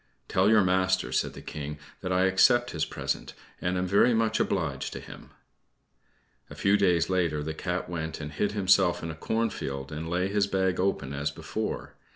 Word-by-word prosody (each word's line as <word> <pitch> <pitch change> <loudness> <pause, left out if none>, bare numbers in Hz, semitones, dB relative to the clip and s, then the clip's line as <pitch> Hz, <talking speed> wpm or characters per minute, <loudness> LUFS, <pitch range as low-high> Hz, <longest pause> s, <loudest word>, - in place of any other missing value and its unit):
"Tell - - +3
your 110 -2 +6
master," 95 0 +1
said - - 0
the - - -10
King, 75 0 -6 0.2
"that 90 - -3
I 90 0 +3
accept 120 +6 +4
his 80 -3 -1
present, - - -4 0.3
and 90 +1 0
am 90 - 0
very 100 +6 +4
much 110 0 +1
obliged 80 -9 -1
to - - -5
him." - - -12 1.2
A - - -10
few 100 +1 +3
days 90 -5 +3
later, 85 -5 0
the 80 +1 -3
Cat 90 +3 -3
went 80 -2 -4
and 75 -1 -6
hid 100 +7 -1
himself 95 -3 +3
in 85 - -3
a - - -8
cornfield 75 -9 -2
and 80 +2 -5
laid 90 +3 0
his 100 -1 +2
bag 95 -2 0
open 90 -8 0
as 70 +1 -1
before. 70 - -4
90 Hz, 190 wpm, -28 LUFS, 80-100 Hz, 1.2 s, your